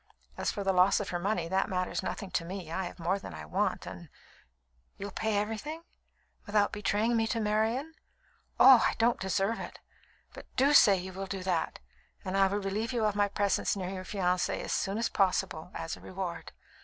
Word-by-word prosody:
As - - -1
for 200 - -4
the 195 0 +2
loss 185 +2 +5
of 205 - -4
her 175 - -2
money, 180 -2 -1
that 190 +2 0
matters 185 -1 -1
nothing 195 -3 -5
to 170 - 0
me. 175 -1 -7
I 190 +2 -2
have 175 - -8
more 180 +3 0
than 85 - -9
I 75 -1 -8
want, 75 - -1
and - - -9 0.4
" - - -42
"You'll 200 0 -6
pay 220 0 -1
everything, 225 +11 -3 0.6
without 205 0 +2
betraying 210 +3 +1
me 225 -1 +2
to 230 - -1
Marian? 225 +8 0 0.7
Oh! 260 -3 +9
I - - -4
don't 235 +1 +2
deserve 195 +3 0
it; - - -7 0.6
but - - -11
do 275 +3 +4
say 200 -8 +7
you 185 +1 -6
will 195 +1 -5
do 190 -1 -4
that, 175 -3 -1 0.5
and 185 0 -2
I 195 0 +5
will 200 +2 -1
relieve 205 +3 -2
you 230 -3 +1
of 210 - +2
my 205 0 +3
presence 200 0 0
near 185 -2 -4
your 185 -1 -5
fiancée 180 -2 0
as - - -3
soon 195 +2 -1
as 230 - +1
possible, 180 -4 0
as 165 - -4
a - - -16
reward. 185 -2 -5
195 Hz, 205 wpm, -30 LUFS, 185-215 Hz, 0.7 s, Oh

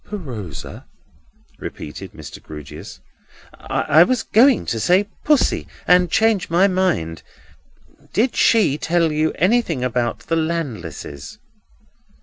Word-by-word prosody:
"PRosa?" 125 - -8 0.7
repeated 95 +5 -8
Mr. 75 -4 -10
Grewgious. 75 -4 -10 0.5
"I 155 +3 +2
was 240 +6 +3
going 250 +4 +4
to 115 - -2
say 185 - +3 0.2
Pussy, 295 -3 +2 0.2
and 180 0 +5
changed 220 -1 +2
my 175 +4 +4
mind;—did 185 - -4
she 185 -11 +3
tell 165 0 +1
you 155 +1 +1
anything 185 - +1
about 120 -2 -1
the 165 - -2
Landlesses?" 110 - -4
165 Hz, 105 wpm, -20 LUFS, -, 0.7 s, and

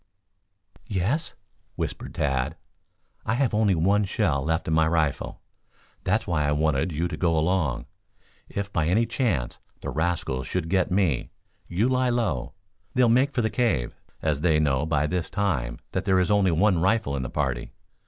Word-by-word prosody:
"Yes?" 110 - -1 0.4
whispered - - -4
Tad. 65 +1 0 0.7
"I 110 - 0
have 130 -3 +1
only 105 -3 +3
one 100 +6 +3
shell 90 -8 0
left 80 +1 -1
in 80 - +1
my 80 0 +4
rifle. 80 -4 -1 0.6
That's 105 +4 +1
why 75 -5 0
I 75 - +2
wanted 80 +2 +1
you 80 +3 -1
to 85 - -4
go 85 -2 +1
along. 80 -5 +1 0.6
If, 100 0 -4
by 80 -3 +1
any 110 +7 +3
chance, 115 - -1 0.2
the - - -4
rascals 80 -6 -1
should 90 -3 -2
get 95 0 +2
me, 90 -9 +1 0.4
you 95 +7 +1
lie 130 -1 +2
low. 105 - -1 0.4
They'll 125 -2 +5
make 130 +5 +4
for 120 -4 0
the 110 - 0
cave, 85 - 0 0.3
as 75 -2 0
they 80 -2 +3
know, 75 0 +1
by 75 -2 +1
this 90 +2 -2
time, 80 - -1
that 95 0 -2
there 95 -2 +3
is 90 +3 +1
only 100 -2 +4
one 90 +1 +3
rifle 95 -6 +1
in 70 - -2
the 60 - -4
party. 65 -4 -2
85 Hz, 175 wpm, -25 LUFS, 75-105 Hz, 0.7 s, They'll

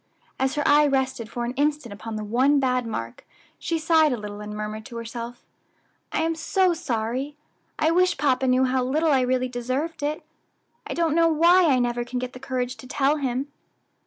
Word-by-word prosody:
As 265 +1 0
her 295 - 0
eye 295 +1 +6
rested 265 -4 -1
for 240 0 -3
an 240 - -3
instant 290 -4 -1
upon 220 +2 -7
the 215 - -4
one 260 +7 +3
bad 255 -2 0
mark, 115 - -5 0.4
she 335 - -1
sighed 320 -1 +4
a 250 - -1
little, 210 -1 -7
and 210 0 -7
murmured 215 +1 -5
to 240 -3 -8
herself, 235 +1 -7 0.7
"I - - 0
am 330 0 +1
so 360 +3 +1
sorry; 265 -2 -3 0.4
I 310 +1 +2
wish 360 0 +3
papa 270 -2 +1
knew 255 +1 +3
how 255 0 +1
little 305 +5 +1
I 270 -2 +4
really 255 0 +1
deserved 255 +7 -3
it. 300 +2 -3 0.6
I - - -4
don't 330 -2 +1
know 330 +1 +4
why 340 +3 +5
I 270 -4 +4
never 240 -1 0
can 245 +1 -5
get 250 0 -4
the 255 - -9
courage 250 -1 -3
to 255 - -12
tell 280 +3 +1
him." 270 0 -2
260 Hz, 200 wpm, -24 LUFS, 240-300 Hz, 0.7 s, eye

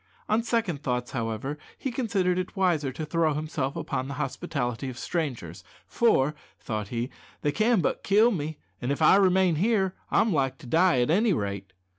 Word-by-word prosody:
On 215 +2 +2
second 225 - -1
thoughts, 125 -3 -2
however, 120 +4 -3 0.2
he 265 - -3
considered 195 -7 0
it 185 - -5
wiser 170 -8 +1
to 155 +4 -5
throw 160 -1 +1
himself 150 -3 -2
upon 130 +1 -3
the 140 - -5
hospitality 135 -4 -3
of 125 - -7
the 130 - -8
strangers; 125 - -3 0.2
"for," 150 - +2 0.3
thought 105 -3 -4
he, 120 +4 -3 0.3
"they 145 - +2
can 215 +3 +2
but - - -1
kill 215 +4 +5
me, 155 -5 -3 0.2
an' 125 - -2
if 140 - 0
I 155 - +7
remain 185 -3 +3
here 195 0 +2 0.2
I'm 220 -3 +3
like 135 -3 0
to 160 - -14
die 165 +1 +3
at 120 - +1
any 210 +4 +3
rate." 100 - -3
155 Hz, 185 wpm, -27 LUFS, 130-190 Hz, 0.3 s, I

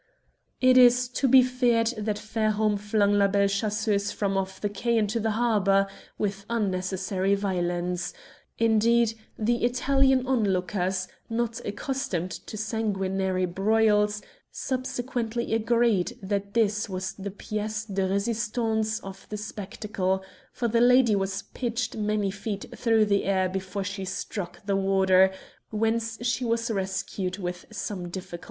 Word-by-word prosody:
It 255 0 +6
is 245 0 +6
to 265 +2 0
be 260 0 +7
feared 245 -2 +2
that 215 -1 -2
Fairholme 215 -1 0
flung 205 0 +2
La 200 -1 +4
Belle 200 0 +3
Chasseuse 205 0 0
from 195 -1 -1
off 190 0 -2
the 205 - -1
quay 230 +4 0
into 215 +1 +1
the 220 0 0
harbour 200 -4 +3 0.3
with 200 -1 -2
unnecessary 190 -2 0
violence. 180 -2 -1 0.5
Indeed, 230 +1 +3 0.2
the 235 +2 0
Italian 265 +1 +3
onlookers, 190 -6 0 0.2
not 230 0 -2
accustomed 205 -6 -3
to 215 - -7
sanguinary 195 -4 -1
broils, 210 +2 +2 0.3
subsequently 245 -3 -3
agreed 230 -4 +2
that 200 +1 -3
this 210 -1 +1
was 190 0 -3
the 200 0 -6
pièce 215 +2 -4
de 190 0 +1
resistance 220 +2 0
of 195 0 -10
the 210 - -4
spectacle, 205 -2 -3 0.3
for 240 - -1
the 230 +1 +2
lady 245 -2 +5
was 195 0 -2
pitched 240 -1 -2
many 210 -2 0
feet 200 0 -5
through 225 -2 +3
the 200 -1 +1
air 190 -1 +2
before 190 +1 -4
she 195 0 -4
struck 190 0 -5
the 200 -1 +1
water, 190 -1 +4 0.4
whence 225 +1 0
she 245 +1 0
was 230 0 0
rescued 190 -1 -2
with 180 -2 -5
some 200 -5 -4
difficulty. 180 -1 -7
210 Hz, 135 wpm, -26 LUFS, 195-230 Hz, 0.5 s, be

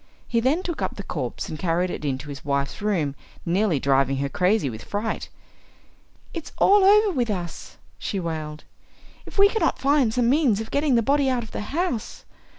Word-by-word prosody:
He 230 - +1
then 280 +10 +1
took 340 -4 -4
up - - -2
the - - -6
corpse - - -4
and 155 - -6
carried 180 +1 0
it - - -6
into 140 0 -3
his 140 -1 -8
wife's 140 +2 -2
room, 180 -9 0 0.3
nearly 175 -2 +1
driving 135 0 +2
her 140 +1 -1
crazy 180 +2 +2
with 110 -3 -6
fright. 210 +2 -3 1.0
"It 335 -3 -5
is - - -10
all 405 0 +5
over 415 +1 +6
with 245 -8 -1
us!" 175 -5 -5 0.2
she 200 - -3
wailed, 155 -3 -5 0.6
"if - - -11
we 400 0 +8
cannot 445 +2 0
find 275 -4 +3
some 240 +1 +1
means 260 -6 +3
of 220 - -6
getting 285 -2 +2
the 230 - +3
body 280 +2 +2
out 250 -2 0
of 220 - -11
the - - -4
house. 280 - -3
215 Hz, 195 wpm, -24 LUFS, -, 1.0 s, we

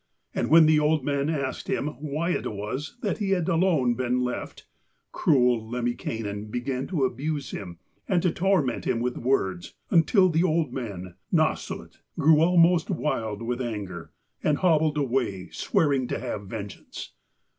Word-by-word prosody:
And - - -1
when 160 +1 +8
the 155 0 +5
old 150 -2 +1
man 140 0 0
asked 140 -4 -3
him 150 - -1
why 155 +4 -2
it - - -2
was 110 - -5
that 205 0 -1
he 205 -2 -1
had 170 - -2
alone 165 -8 +2
been 125 0 0
left, 125 -1 -4 0.5
cruel 125 -5 +3
Lemminkainen 115 -4 -3
began 125 +3 -3
to 160 -8 -1
abuse 140 +3 -3
him 90 -4 -7 0.3
and 185 - +2
to 180 - +3
torment 175 -10 +1
him 115 - 0
with 125 +1 -1
words, 95 -9 -1 0.2
until 185 +3 +5
the 165 +1 +2
old 160 -6 +1
man, 95 -9 -6
Nasshut, - - -1 0.2
grew 155 +1 +5
almost 170 +1 +4
wild 115 - -2
with 120 +2 -2
anger, 100 -8 -5 0.3
and 150 -1 +2
hobbled 160 -4 +2
away, 120 - -1
swearing 140 -5 +1
to - - -2
have 105 -5 -5
vengeance. 100 -2 -8
135 Hz, 155 wpm, -26 LUFS, 115-160 Hz, 0.5 s, when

